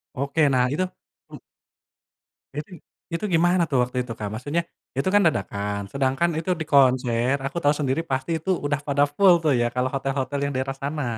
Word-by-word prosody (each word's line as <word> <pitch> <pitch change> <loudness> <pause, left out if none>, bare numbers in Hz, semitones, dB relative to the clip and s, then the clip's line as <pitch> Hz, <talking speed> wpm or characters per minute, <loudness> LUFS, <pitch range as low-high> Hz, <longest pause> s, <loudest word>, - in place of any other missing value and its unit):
Oke. 140 +4 -1
Nah 125 -1 +3
itu 185 +4 0 0.4
hmm? - - -10 1.1
Besing 150 +4 -7 0.4
itu 170 - -2
gimana 175 +2 +3
tuh 135 - +1
waktu 125 +1 -2
itu, 115 - -8
Kak? 105 -1 -4
Maksudnya, 145 +9 -1 0.4
itu 135 - 0
kan 205 - +6
dadakan 100 - -1
sedangkan 140 +5 +1
itu 165 +3 -3
di - - -2
konser 125 -2 +3
aku 155 - -4
tahu 145 +1 +4
sendiri 140 +3 0
pasti 130 +5 -1
itu 190 - -6 0.2
udah 145 0 0
pada 140 0 +2
full 185 +5 +5
tuh 150 -3 +3
ya - - +2
kalau 125 0 +1
hotel-hotel 135 0 -2
yang 140 - -2
daerah 135 +1 -1
sana. 145 +1 -3
140 Hz, 185 wpm, -24 LUFS, 130-160 Hz, 1.1 s, kan